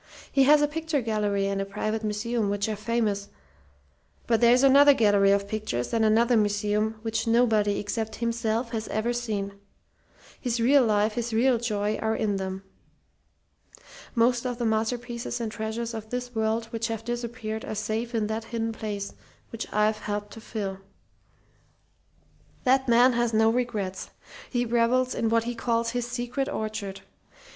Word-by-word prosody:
He 270 -1 +4
has 295 +1 +6
a - - +4
picture 320 0 -2
gallery 210 -4 0
and 195 0 -1
a - - 0
private 215 +2 -3
museum 215 +1 -1
which 205 +1 -1
are 215 - -2
famous; 210 -2 -1 1.0
but 230 -1 +2
there's 245 +2 +5
another 280 +1 +7
gallery 205 -4 +4
of 200 0 +1
pictures 210 - -3
and 225 -1 +2
another 230 +3 +4
museum 210 +1 +1
which 225 0 -2
nobody 225 -3 +3
except 220 +2 -3
himself 230 0 -1
has 220 -1 -3
ever 220 +3 -1
seen. 215 -5 -3 0.9
His 245 -2 -1
real 265 +4 +5
life, 210 -1 +2
his 235 0 -3
real 245 +1 +3
joy, 210 -2 -1
are 220 0 0
in 205 -2 0
them. 190 0 -4 1.5
Most 235 +1 +3
of 250 -2 -3
the 240 - -2
masterpieces 235 +2 -2
and 225 -2 -3
treasures 225 +2 -4
of 220 -1 -7
this 245 0 -4
world 220 0 0
which 230 0 -2
have 225 -1 -5
disappeared 235 -2 -4
are - - -5
safe 220 +3 -3
in 220 -2 +1
that 220 +1 -3
hidden 225 -1 -2
place, 210 -3 -5 0.4
which 230 -1 -6
I've 215 +1 +2
helped 205 0 -4
to 225 - -10
fill. 200 -4 -4 1.8
"That 265 0 +3
man 245 +2 +5
has 240 -1 0
no 220 +1 +4
regrets. 220 -6 -2 0.4
He 245 -1 0
revels 240 +2 +2
in 225 - 0
what 230 0 +2
he 240 +1 -3
calls 230 0 0
his 245 0 -2
'secret 245 +3 -3
orchard.' 215 -3 -4
225 Hz, 160 wpm, -26 LUFS, 210-240 Hz, 1.8 s, another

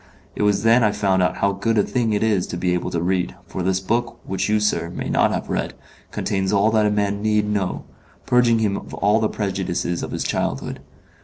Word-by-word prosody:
It - - -3
was 100 0 +2
then 115 +2 +5
I 105 - +4
found 95 -3 +1
out 90 -3 +1
how 100 - +2
good 110 +4 -1
a 105 - +4
thing 120 -1 0
it 105 +1 +1
is 105 -5 +1
to 85 - -5
be 90 0 0
able 90 - -1
to 85 -1 -2
read, 90 0 0
for 95 - -5
this 95 +1 +1
book, 115 +5 -1
which 95 +1 -2
you, 105 0 +3
sir, 105 -5 0
may 85 - -5
not - - +3
have - - -3
read, - - -2 0.4
contains 95 -1 -1
all 105 +2 +3
that 110 -1 +3
a - - +3
man 100 -1 0
need 105 -1 +1
know 100 -3 -2 0.4
purging 120 -2 +4
him 105 -3 +1
of - - -8
all 105 +2 +2
the 110 - +1
prejudices 95 -4 -2
of - - -4
his - - -3
childhood. - - -2
100 Hz, 230 wpm, -22 LUFS, 95-110 Hz, 0.4 s, then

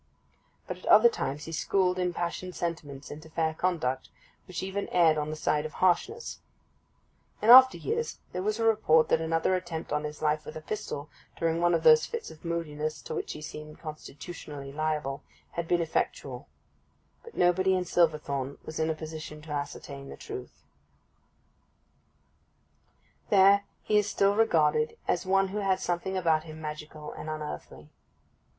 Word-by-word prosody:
But - - -5
at - - -14
other 475 - +8
times 150 - -4
he 165 - -7
schooled 185 +2 +1
impassioned 180 0 -2
sentiments 155 -5 -5
into 155 +2 -9
fair 160 0 0
conduct, 155 -7 -1 0.4
which 185 0 -5
even 195 +1 -3
erred 165 -3 +5
on 150 0 -2
the 155 - -3
side 150 -1 0
of 155 -1 -6
harshness. 185 - 0 1.0
In 225 - +5
after 260 +1 +10
years 460 +2 -2 0.2
there 180 - -2
was 210 +3 0
a - - 0
report 210 -8 +4
that 160 - +3
another 165 +2 +1
attempt 175 -4 -3
on 150 0 0
his 150 0 -6
life 150 0 +1
with - - -9
a 155 - -6
pistol, 155 -5 -5 0.3
during 165 0 0
one 175 0 +4
of - - -1
those 465 -1 +7
fits 465 -1 -5
of 155 - -15
moodiness 155 -3 -3
to - - -5
which - - -3
he 150 - -9
seemed 150 0 -8
constitutionally 150 -2 -8
liable, 150 -2 -2 0.3
had 170 -1 -4
been 175 0 +2
effectual; 160 - -2 0.8
but 465 - -13
nobody 185 +2 +3
in 180 -1 0
Silverthorn 150 -5 +1
was 155 - -6
in 160 0 +1
a 160 - 0
position 155 -1 -7
to 155 - -10
ascertain 140 -1 -5
the - - -9
truth. 410 -2 -9 2.7
There 200 0 +6 0.2
he 210 -1 +3
is 205 0 -1
still 200 0 +3
regarded 155 -8 +3
as 180 +2 0
one 195 0 +3
who 205 +2 -3
had 190 -2 +1
something 180 +2 -2
about 160 -3 +2
him 155 -1 -9
magical 150 0 -7
and 155 - -7
unearthly. 155 -1 -7
165 Hz, 165 wpm, -29 LUFS, 150-190 Hz, 2.7 s, after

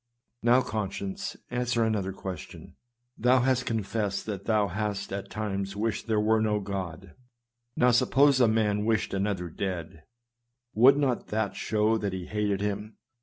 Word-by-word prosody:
Now, 120 +2 +4
conscience, 155 - -4
answer 120 -1 0
another 105 -4 0
question! 95 -3 -8 0.4
Thou 125 +2 +4
hast 125 0 +1
confessed 105 -2 -2
that 100 -3 -5
thou 105 -2 +2
hast 100 +1 -3
at 100 0 -5
times 100 -2 -3
wished 110 +3 -2
there 110 -2 +2
were 110 +1 +3
no 105 -1 +1
God; 95 -2 -5 0.6
now, 125 0 +4
suppose 135 +3 +4
a 120 - +6
man 105 -2 +1
wished 110 -4 0
another 95 -2 -1
dead, 85 -2 -5 0.7
would 130 +6 +6
not 135 -4 0
that 110 -1 -1
show 110 +1 +1
that 100 -2 -2
he 95 -1 -4
hated 105 -1 -1
him 105 +1 -3
105 Hz, 150 wpm, -28 LUFS, 100-115 Hz, 0.7 s, a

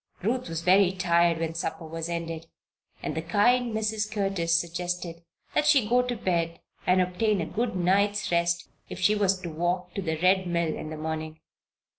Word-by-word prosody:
Ruth 245 +1 -1
was 165 0 -4
very 185 +1 +5
tired 170 -2 +2
when 165 0 -2
supper 165 0 -4
was 165 +1 -5
ended 165 -1 -4 0.6
and - - -2
the 160 - -2
kind 235 +8 +2
Mrs. 215 -1 -1
Curtis 195 -5 +1
suggested 175 0 -4 0.4
that 300 - +2
she 275 -8 +5
go 245 +3 +4
to 250 -1 -2
bed 170 -5 -1 0.3
and 185 +1 +4
obtain 195 +3 0
a 165 - -1
good 230 +2 -2
night's 195 +3 +1
rest 170 0 +1 0.2
if - - -7
she 185 +3 +4
was 195 -2 +2
to 175 - -5
walk 175 +2 -2
to 200 - -3
the 160 -3 -2
Red 185 +1 +3
Mill 170 -2 0
in 155 - -6
the 155 - -6
morning. 155 0 -4
180 Hz, 185 wpm, -27 LUFS, 165-205 Hz, 0.6 s, very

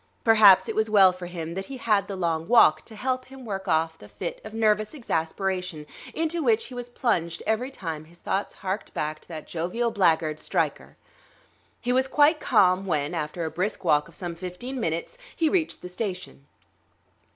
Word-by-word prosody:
Perhaps 215 -4 +7
it - - -3
was 220 0 +1
well 195 -3 +6
for 180 -1 -8
him 170 -2 -5
that 195 +2 -5
he 275 - -7
had 210 -5 +1
the 200 - -5
long 165 -3 -1
walk 155 -9 +6
to 220 - -12
help 255 +3 -2
him 265 -1 -12
work 195 -2 -5
off 160 -1 +1
the 105 - -13
fit 105 - -6
of 215 - -8
nervous 215 +2 +1
exasperation 180 - -2 0.3
into 325 +1 -1
which 230 -6 +2
he - - -10
was 245 0 -6
plunged 170 -9 -1
every 220 +4 0
time 165 - -6
his 170 +2 -19
thoughts 195 +3 -2
harked 190 +3 -3
back 155 0 -2
to - - -24
that 160 -3 -7
jovial 180 +8 -2
black 175 -7 +3
guard, 155 -1 -4
Stryker.... - - -2 0.8
He 245 0 -1
was 260 +1 +2
quite 300 +3 +4
calm 185 -4 +3
when, 150 -4 0
after 155 +3 -3
a 160 - -3
brisk 185 +7 -2
walk 150 -2 +3
of - - -17
some 175 -2 -5
fifteen 185 +10 -6
minutes, 170 - -3 0.2
he 320 -2 +2
reached 325 -1 -1
the - - -5
station. 180 -7 -6
190 Hz, 195 wpm, -26 LUFS, 165-235 Hz, 0.8 s, Perhaps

